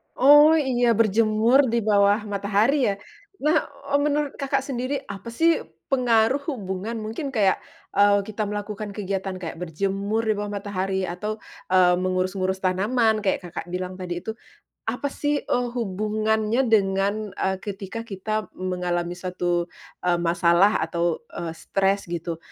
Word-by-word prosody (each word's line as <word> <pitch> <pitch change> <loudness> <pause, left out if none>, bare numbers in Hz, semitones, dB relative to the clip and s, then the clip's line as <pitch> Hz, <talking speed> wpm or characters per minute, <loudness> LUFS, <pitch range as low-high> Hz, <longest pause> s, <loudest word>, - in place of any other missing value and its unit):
Oh 295 +4 +7
iya 245 -6 +2
berjemur 225 +4 +4
di 230 -1 0
bawah 205 0 +3
matahari 210 +6 +1
ya? - - -8 0.5
Nah, 305 +1 +2 0.2
eee, 285 - +4
menurut 295 -1 0
Kakak 275 -1 0
sendiri 270 +1 -3
apa 200 +2 -7
sih 325 +8 +3 0.3
pengaruh 245 0 +3
hubungan 200 -2 -4
mungkin 225 +7 -4
kayak, 200 -6 +2 0.4
eee, 205 0 +5
kita 215 0 -3
melakukan 205 0 -5
kegiatan 195 -2 -3
kayak 165 -2 -6
berjemur 195 +6 -1
di 220 - +2
bawah 205 0 -4
matahari 195 -2 -2
atau, 210 +5 -4 0.3
eee, 180 -1 +5
mengurus-ngurus 185 +1 -1
tanaman 215 +4 +2
kayak 190 -2 0
Kakak 175 0 -6
bilang 185 +1 -4
tadi 175 -1 -4
itu, 220 - -3 0.5
apa 245 +5 -2
sih, 290 +1 -1
eee, 245 0 0
hubungannya 215 +1 0
dengan, 200 0 +1
eee, 190 0 -1
ketika 205 +3 -6
kita 215 0 -3
mengalami 180 -1 -2
suatu, 175 -1 -1 0.4
eee, 175 -1 +3
masalah 170 +4 +4
atau, 170 +5 -1
eee, 165 -1 -4
stres 195 +1 0
gitu? 170 -1 -4
205 Hz, 140 wpm, -24 LUFS, 185-230 Hz, 0.5 s, Oh